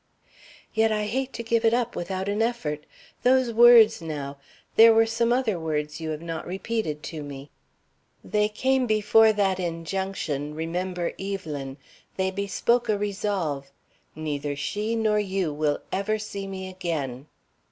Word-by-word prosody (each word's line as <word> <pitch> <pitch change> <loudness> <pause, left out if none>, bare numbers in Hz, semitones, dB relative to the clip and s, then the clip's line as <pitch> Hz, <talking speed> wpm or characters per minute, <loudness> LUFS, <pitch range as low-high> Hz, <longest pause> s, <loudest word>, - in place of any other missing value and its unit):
"Yet 220 0 +3
I 210 -1 0
hate 260 +5 -2
to 235 - -5
give 230 0 +1
it 225 +1 +4
up 240 -1 -1
without 190 +2 -3
an 205 +2 0
effort. 160 -11 -2 0.3
Those 255 -1 +3
words, 225 -2 +7
now. 145 -3 -5 0.4
There 225 0 +8
were 225 0 +6
some 230 +1 0
other 240 -7 +1
words 150 -1 -3
you 160 - -3
have 155 +1 -4
not 165 -1 -5
repeated 190 -4 -3
to 160 -2 -6
me." 140 -1 -9 0.7
"They 210 0 +1
came 260 +4 +1
before 220 +1 +5
that 195 -3 +1
injunction, 165 -4 -3
'Remember 175 +2 -2
Evelyn!' 150 -9 -5 0.4
They 190 0 0
bespoke 225 +5 0
a 210 - +3
resolve. 195 -9 -2 0.4
'Neither 145 -2 -3
she 210 +10 -2
nor 215 -2 +2
you 190 -6 -1
will 150 0 0
ever 205 +3 0
see 200 -2 -6
me 190 -1 -6
again.'" 155 -8 -4
195 Hz, 150 wpm, -25 LUFS, 155-220 Hz, 0.7 s, There